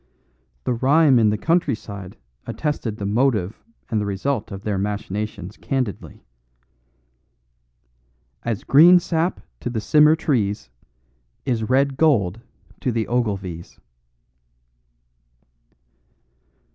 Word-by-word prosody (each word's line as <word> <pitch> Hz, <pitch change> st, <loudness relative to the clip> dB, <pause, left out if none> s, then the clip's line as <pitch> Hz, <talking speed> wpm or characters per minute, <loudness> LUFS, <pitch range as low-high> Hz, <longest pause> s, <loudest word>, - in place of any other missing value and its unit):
The 125 Hz, -, 0 dB
rhyme 135 Hz, +2 st, +4 dB
in 110 Hz, -2 st, +4 dB
the 105 Hz, -, 0 dB
country 165 Hz, 0 st, +1 dB
side 100 Hz, -4 st, -10 dB, 0.3 s
attested 135 Hz, -8 st, -3 dB
the 100 Hz, -, -4 dB
motive 105 Hz, -3 st, 0 dB, 0.3 s
and 110 Hz, -2 st, +1 dB
the -, -, -2 dB
result 105 Hz, +4 st, -2 dB
of 100 Hz, 0 st, -7 dB
their 100 Hz, -3 st, -1 dB
machinations 100 Hz, -1 st, -4 dB
candidly: 130 Hz, -7 st, -4 dB, 2.2 s
As 115 Hz, -4 st, -3 dB
green 170 Hz, +6 st, +7 dB
sap 170 Hz, 0 st, -1 dB, 0.2 s
to -, -, -4 dB
the 120 Hz, -2 st, -2 dB
simmer 150 Hz, +7 st, +5 dB
trees 105 Hz, -, -1 dB, 0.7 s
Is 115 Hz, -4 st, -1 dB
red 135 Hz, +1 st, +2 dB
gold 115 Hz, -, +2 dB, 0.4 s
to 125 Hz, -, -1 dB
the 115 Hz, -1 st, -1 dB
Ogilvies. 100 Hz, -8 st, -3 dB
115 Hz, 105 wpm, -22 LUFS, 100-140 Hz, 2.2 s, green